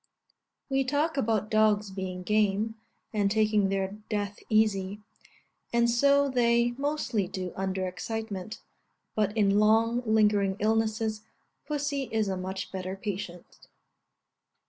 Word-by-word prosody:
We 270 Hz, -1 st, +1 dB
talk 290 Hz, +5 st, 0 dB
about 220 Hz, -5 st, 0 dB
dogs 215 Hz, -2 st, +3 dB
being 185 Hz, -1 st, -5 dB
game, 210 Hz, +2 st, +1 dB, 0.4 s
and 205 Hz, -2 st, +2 dB
taking 215 Hz, -1 st, +2 dB
their 195 Hz, -1 st, 0 dB, 0.2 s
death 205 Hz, -2 st, -2 dB
easy; 210 Hz, -2 st, +2 dB, 0.7 s
and 235 Hz, 0 st, +3 dB
so 280 Hz, +4 st, +4 dB
they 235 Hz, -2 st, +3 dB
mostly 260 Hz, -6 st, -1 dB
do 185 Hz, -1 st, -5 dB
under 190 Hz, 0 st, -2 dB
excitement; 215 Hz, +1 st, -5 dB, 0.5 s
but 210 Hz, 0 st, 0 dB
in 200 Hz, -1 st, +4 dB
long 225 Hz, +3 st, +3 dB
lingering 210 Hz, -3 st, +3 dB
illnesses, 220 Hz, 0 st, 0 dB, 0.5 s
pussy 285 Hz, -2 st, -2 dB
is 220 Hz, -2 st, +1 dB
a 190 Hz, -, -1 dB
much 190 Hz, +1 st, -5 dB
better 185 Hz, 0 st, -4 dB
patient. 190 Hz, -3 st, -7 dB
215 Hz, 120 wpm, -28 LUFS, 195-230 Hz, 0.7 s, so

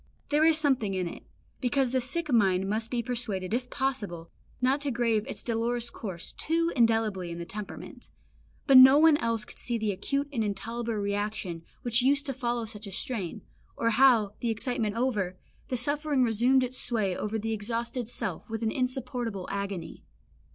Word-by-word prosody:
There 300 Hz, +1 st, +3 dB
is 320 Hz, -1 st, +6 dB
something 265 Hz, -10 st, +1 dB
in 185 Hz, -1 st, -1 dB
it, -, -, -8 dB, 0.4 s
because 260 Hz, 0 st, +1 dB
the 260 Hz, 0 st, +1 dB
sick 295 Hz, +4 st, -1 dB
mind 195 Hz, -4 st, +3 dB
must 220 Hz, +3 st, -1 dB
be 240 Hz, -1 st, -1 dB
persuaded 220 Hz, -6 st, -3 dB
if 250 Hz, +1 st, -1 dB
possible 220 Hz, -12 st, -3 dB, 0.3 s
not 265 Hz, +3 st, +2 dB
to 290 Hz, -, -1 dB
grave 230 Hz, -3 st, 0 dB
its -, -, -5 dB
dolorous 235 Hz, 0 st, -1 dB
course 185 Hz, -7 st, -5 dB
too 335 Hz, +1 st, +1 dB
indelibly 225 Hz, -6 st, +2 dB
in 170 Hz, -, -6 dB
the 170 Hz, -, -5 dB
temperament; 205 Hz, +4 st, -8 dB, 0.6 s
but 270 Hz, -2 st, +7 dB
no 265 Hz, +2 st, +9 dB
one 315 Hz, 0 st, +6 dB
else 230 Hz, -5 st, -1 dB
could -, -, -12 dB
see 240 Hz, -1 st, -1 dB
the 215 Hz, -2 st, 0 dB
acute 275 Hz, +9 st, -2 dB
and 230 Hz, -4 st, 0 dB
intolerable 225 Hz, +3 st, -3 dB
reaction 200 Hz, -4 st, -2 dB, 0.2 s
which 240 Hz, 0 st, +2 dB
used 280 Hz, +3 st, +2 dB
to 270 Hz, -, -2 dB
follow 240 Hz, -2 st, -2 dB
such 215 Hz, -1 st, -8 dB
a -, -, -7 dB
strain, 195 Hz, -2 st, -4 dB, 0.3 s
or 230 Hz, -, +1 dB
how, 230 Hz, -4 st, +5 dB
the 235 Hz, -, -1 dB
excitement 225 Hz, -1 st, 0 dB
over, 210 Hz, -7 st, -1 dB, 0.3 s
the 255 Hz, -, -2 dB
suffering 285 Hz, +1 st, +1 dB
resumed 245 Hz, +3 st, +3 dB
its 255 Hz, 0 st, -3 dB
sway 210 Hz, -6 st, 0 dB
over 210 Hz, +3 st, -2 dB
the 225 Hz, +1 st, -2 dB
exhausted 230 Hz, +3 st, -3 dB
self 240 Hz, -, -3 dB
with 225 Hz, +1 st, -4 dB
an 220 Hz, -, +1 dB
insupportable 250 Hz, -6 st, -3 dB
agony. 195 Hz, -4 st, -5 dB
230 Hz, 180 wpm, -28 LUFS, 205-255 Hz, 0.6 s, no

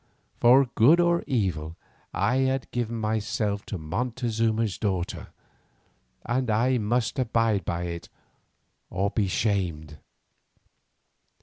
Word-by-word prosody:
For 130 Hz, +3 st, +6 dB
good 145 Hz, +10 st, +5 dB
or 170 Hz, 0 st, +3 dB
evil 85 Hz, -, -1 dB, 0.4 s
I 125 Hz, -, +1 dB
had 130 Hz, 0 st, 0 dB
given 120 Hz, -1 st, -2 dB
myself 110 Hz, -2 st, -1 dB
to 100 Hz, -, -4 dB
Montezuma's 115 Hz, +4 st, -1 dB
daughter, 95 Hz, -4 st, -2 dB, 1.0 s
and 125 Hz, +1 st, -1 dB
I 120 Hz, +4 st, +2 dB
must 115 Hz, +4 st, 0 dB
abide 115 Hz, -6 st, +1 dB
by 85 Hz, 0 st, -2 dB
it 85 Hz, -1 st, -6 dB, 0.8 s
or 100 Hz, +2 st, -1 dB
be 105 Hz, -4 st, 0 dB
shamed. 85 Hz, -8 st, -1 dB
110 Hz, 105 wpm, -26 LUFS, 95-125 Hz, 1.0 s, For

